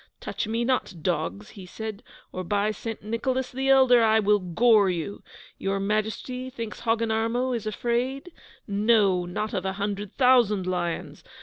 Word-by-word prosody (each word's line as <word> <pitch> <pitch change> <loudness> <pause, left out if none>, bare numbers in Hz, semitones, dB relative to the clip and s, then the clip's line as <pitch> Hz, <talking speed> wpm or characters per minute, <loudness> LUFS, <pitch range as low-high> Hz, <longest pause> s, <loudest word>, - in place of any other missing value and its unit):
'Touch - - -4
me 230 +2 -1
not, 255 -6 0
dogs!' 105 - -2
he 195 - -11
said, 215 +3 -7 0.3
'or 185 - -5
by 205 +3 0
St. 225 +1 -6
Nicholas 255 +4 -2
the 265 +1 -2
Elder, 260 -3 +6
I 220 0 +4
will 210 0 +3
gore 200 +3 +4
you! 180 +3 -4 0.4
Your 195 0 -1
Majesty 220 +5 -2
thinks 230 -4 -7
Hogginarmo 230 +2 0
is 220 -2 -4
afraid? 245 - -2 0.3
No, 200 -3 +2
not 210 +5 -3
of - - -1
a 190 0 -2
hundred 200 0 -3
thousand 240 -7 +4
lions! 175 -4 -3
215 Hz, 150 wpm, -26 LUFS, 195-240 Hz, 0.4 s, Elder